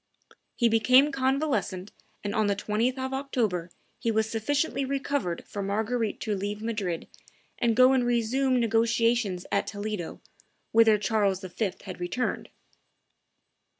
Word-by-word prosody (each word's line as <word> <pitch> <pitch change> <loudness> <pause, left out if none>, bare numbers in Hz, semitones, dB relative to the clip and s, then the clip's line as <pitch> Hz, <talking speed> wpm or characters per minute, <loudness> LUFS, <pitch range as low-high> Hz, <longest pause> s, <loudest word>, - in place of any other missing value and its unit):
He 235 - +3
became 255 +6 +5
convalescent, 260 -8 -1 0.3
and 205 -1 -2
on 215 -1 +2
the 200 - +1
20th 225 +6 0
of 260 0 -3
October 230 -11 -1 0.3
he 230 - -1
was 220 0 +1
sufficiently 275 +6 -1
recovered 275 -9 -2
for 205 - -5
Marguerite 220 +3 -1
to 215 - -1
leave 205 +2 -3
Madrid, 205 -7 -3 0.5
and 235 -2 +2
go 255 +2 +6
and 260 -2 +3
resume 245 +2 +1
negotiations 230 -4 +1
at 200 - +1
Toledo, 205 -4 -5 0.5
whither 225 -1 +6
Charles 200 -2 +1
V. 190 +2 -2
had 185 -3 -8
returned. 180 +8 -2
225 Hz, 130 wpm, -27 LUFS, 205-255 Hz, 0.5 s, go